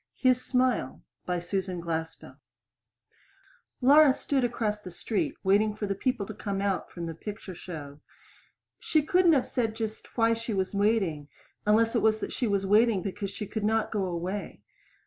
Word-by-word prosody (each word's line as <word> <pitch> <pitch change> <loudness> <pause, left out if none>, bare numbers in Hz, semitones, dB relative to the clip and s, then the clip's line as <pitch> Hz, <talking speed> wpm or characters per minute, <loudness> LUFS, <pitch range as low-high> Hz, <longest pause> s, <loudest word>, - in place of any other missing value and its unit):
HIS 255 -1 +2
SMILE 250 - 0 0.2
By 180 0 0
SUSAN 180 +1 -3
GLASPELL 165 -1 -4
(From - - -19
The - - -51 0.7
Pictorial 280 - +8
Review) 310 - +10
Laura 270 - +5
stood 275 -3 0
across 220 -3 -1
the 185 - -8
street 195 +4 -2
waiting 205 +2 +3
for 215 - -3
the 200 - -1
people 235 +1 -1
to 215 - -7
come 200 -1 -3
out 195 -1 -1
from 170 -1 -6
the 165 - -4
picture 205 +3 -7
show. 150 -5 -8 0.8
She 310 -2 +2
couldn't 355 +1 +4
have 270 -4 +3
said 225 -3 -1
just 220 +1 -6
why 230 0 +4
she 230 -1 -3
was 190 0 -1
waiting, 200 -8 +1 0.4
unless 225 +2 +4
it 230 - +3
was 220 0 +3
that 220 - -5
she 245 - -1
was 200 -2 0
waiting 210 -1 +4
because 195 0 -4
she 200 +2 -6
could 210 +1 -4
not 220 +1 +1
go 205 -3 0
away. 180 +3 -4
210 Hz, 185 wpm, -28 LUFS, 185-230 Hz, 0.8 s, Review